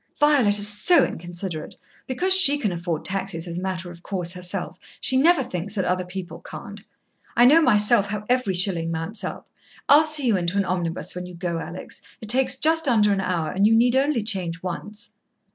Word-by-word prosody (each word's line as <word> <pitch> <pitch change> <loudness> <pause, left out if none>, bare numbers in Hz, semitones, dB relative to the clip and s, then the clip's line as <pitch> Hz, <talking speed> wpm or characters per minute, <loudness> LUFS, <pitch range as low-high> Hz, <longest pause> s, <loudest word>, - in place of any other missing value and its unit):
"Violet 275 -9 +4
is 205 0 +2
so 210 - +3
inconsiderate. 175 -1 -6 0.3
Because 360 +9 +1
she 290 -7 +6
can 215 -9 -1
afford 170 -2 -4
taxis 190 -3 -2
as 170 +1 -5
a - - -6
matter 185 -2 -4
of 175 0 -14
course 180 -3 -4
herself, 180 -1 -6 0.2
she 260 - +2
never 300 +2 +4
thinks 190 0 -6
that 190 -3 -1
other 180 0 -1
people 180 0 -8
can't. - - -10 0.5
I 240 - +5
know 305 +6 +6
myself 210 -5 +4
how 210 +1 -5
every 250 -6 0
shilling 175 -3 +1
mounts 165 +7 -5
up. - - -6 0.4
I'll 295 +2 +7
see 305 -3 0
you 230 -4 +3
into 175 +2 -2
an 200 - +1
omnibus 175 -2 -3
when 180 0 -6
you 180 - -11
go, 170 -1 -3
Alex. 175 +2 -8 0.2
It 215 - -10
takes 260 +2 +1
just 320 +2 +1
under 210 -5 +3
an 195 - -1
hour, 170 -5 -2
and 195 +2 +2
you 225 - +4
need 245 +2 +3
only 270 -3 +1
change 180 -6 -3
once." 210 +5 -7
200 Hz, 200 wpm, -23 LUFS, 180-250 Hz, 0.5 s, I'll